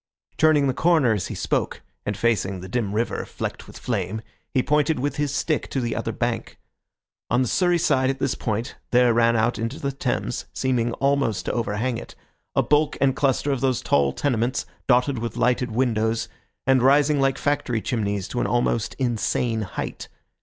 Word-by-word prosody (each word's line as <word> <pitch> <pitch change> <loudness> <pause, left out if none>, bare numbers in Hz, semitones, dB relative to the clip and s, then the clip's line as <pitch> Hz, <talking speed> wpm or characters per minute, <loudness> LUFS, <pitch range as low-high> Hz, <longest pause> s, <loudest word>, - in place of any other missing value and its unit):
Turning 155 -2 +4
the 130 - +1
corner 155 -6 +3
as 100 -4 -2
he - - -6
spoke, - - -2 0.2
and 105 -1 -1
facing 105 -4 0
the 95 - -8
dim 105 -1 -2
river, 115 +3 -1
flecked - - -6
with - - -11
flame, 110 -1 -3 0.3
he 130 -3 +2
pointed 150 +1 +2
with 140 +1 -2
his 145 -2 0
stick 150 +2 -1
to 135 - -1
the 120 -2 -2
other - - -2
bank. - - -3 0.7
On 125 +3 +3
the - - -1
Surrey 175 - +2
side 130 -5 +2
at 135 - -1
this 135 -1 0
point 110 +2 -3 0.2
there 125 -1 +4
ran 115 0 +3
out 115 0 +1
into 115 +6 -3
the 140 - -2
Thames, 125 -2 -2
seeming 125 -3 0
almost 140 -6 0
to - - 0
overhang 115 +1 -1
it, - - -11 0.4
a - - +4
bulk 150 +1 +2
and 135 -1 +3
cluster 140 0 +1
of 135 -3 -1
those 130 -3 +1
tall 70 -1 +3
tenements, 125 - 0 0.2
dotted 125 0 +3
with 115 0 -4
lighted 125 0 +1
windows, 110 -1 0 0.4
and 130 -1 +4
rising 140 +2 +4
like 135 0 +2
factory 140 -5 0
chimneys 105 -5 -2
to 125 - -3
an - - 0
almost 120 -2 0
insane 120 -2 0
height. 100 - -5
125 Hz, 185 wpm, -24 LUFS, 115-140 Hz, 0.7 s, Turning